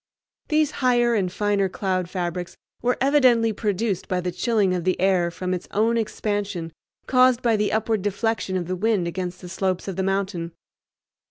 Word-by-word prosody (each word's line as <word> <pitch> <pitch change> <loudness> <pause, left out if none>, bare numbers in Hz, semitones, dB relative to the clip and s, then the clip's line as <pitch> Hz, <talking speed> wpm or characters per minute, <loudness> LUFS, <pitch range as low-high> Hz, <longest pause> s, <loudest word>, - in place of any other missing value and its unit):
These 305 -1 +2
higher 240 -2 +3
and 190 -5 0
finer 205 -1 +1
cloud 185 -2 -2
fabrics 180 -1 -4 0.2
were 245 +1 +1
evidently 255 -5 +4
produced 205 -2 -1
by 185 - 0
the 180 0 -2
chilling 195 +1 +1
of 180 -2 -2
the 185 +1 0
air 185 -2 +2
from 180 +2 -3
its 180 - -4
own 225 +3 +1
expansion 205 -6 -2 0.3
caused 255 -1 +4
by 230 -2 +3
the 210 0 0
upward 220 -1 0
deflection 205 -1 -1
of 175 - -3
the 185 +2 -2
wind 200 -2 +1
against 180 +1 -4
the 180 - -8
slopes 185 0 -2
of 195 - -4
the - - +1
mountain. 190 -3 -2
195 Hz, 175 wpm, -23 LUFS, 180-225 Hz, 0.3 s, evidently